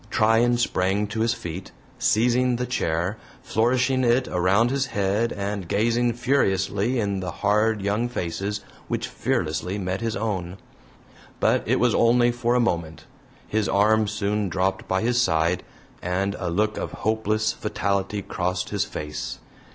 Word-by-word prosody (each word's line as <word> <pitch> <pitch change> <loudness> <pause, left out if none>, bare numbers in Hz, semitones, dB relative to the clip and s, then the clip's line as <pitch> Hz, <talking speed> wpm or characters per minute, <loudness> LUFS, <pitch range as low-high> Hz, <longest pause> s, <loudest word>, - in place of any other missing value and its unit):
Tryan 115 +2 +3
sprang 100 -3 +1
to 110 +1 -4
his 115 +1 +2
feet, 90 -5 -7 0.3
seizing 125 +3 +3
the 125 +1 -2
chair, 90 -4 -1 0.3
flourishing 130 +3 +1
it 125 +2 +3
around 95 +7 +2
his 135 -1 0
head 105 +2 0
and 100 -2 -3
gazing 115 +5 +1
furiously 115 -2 +1
in 100 -3 -1
the 90 -1 -4
hard 105 +3 +1
young 105 +4 0
faces 100 0 -3 0.3
which - - -2
fearlessly 90 +5 -2
met 95 0 -3
his 115 -1 -1
own. 95 -4 -3 0.8
But - - +3
it - - +2
was - - +3
only 120 +1 +4
for 120 0 0
a - - +4
moment; 85 -9 -1 0.4
his 110 -1 0
arm 110 +2 +3
soon 105 -1 -1
dropped 95 +1 -1
by 95 +2 0
his 120 +1 +2
side, 85 -4 +1 0.4
and 95 +3 -1
a 90 - -2
look 105 +5 0
of - - -4
hopeless 110 0 +1
fatality 100 -1 -2
crossed 90 0 -2
his - - 0
face. 75 0 -5
105 Hz, 150 wpm, -24 LUFS, 95-115 Hz, 0.8 s, only